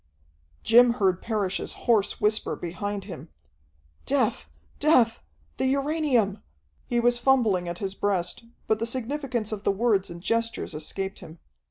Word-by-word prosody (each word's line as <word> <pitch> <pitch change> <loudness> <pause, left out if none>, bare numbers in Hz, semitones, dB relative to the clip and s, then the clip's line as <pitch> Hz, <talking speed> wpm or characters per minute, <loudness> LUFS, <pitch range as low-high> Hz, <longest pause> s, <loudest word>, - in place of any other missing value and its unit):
Jim 240 +1 +6
heard 190 -6 +1
Parrish's 205 -4 -2
hoarse 220 -5 +2
whisper 215 +1 +1
behind 195 +4 -4
him, 180 -5 -9 0.8
"Death! 75 - 0 0.3
Death! 250 -7 +4 0.4
The 265 - +1
uranium!" 275 -7 +1 0.5
He 240 - +1
was 240 0 +3
fumbling 225 -9 +2
at 175 - -5
his 195 -1 -4
breast, 195 -1 -1 0.2
but 220 - +1
the 230 - -1
significance 255 -2 -2
of 210 -2 -4
the - - 0
words 200 -1 +1
and 170 - -8
gestures 230 0 -1
escaped 190 +6 -5
him. 160 +2 -12
215 Hz, 140 wpm, -26 LUFS, 195-240 Hz, 0.8 s, Jim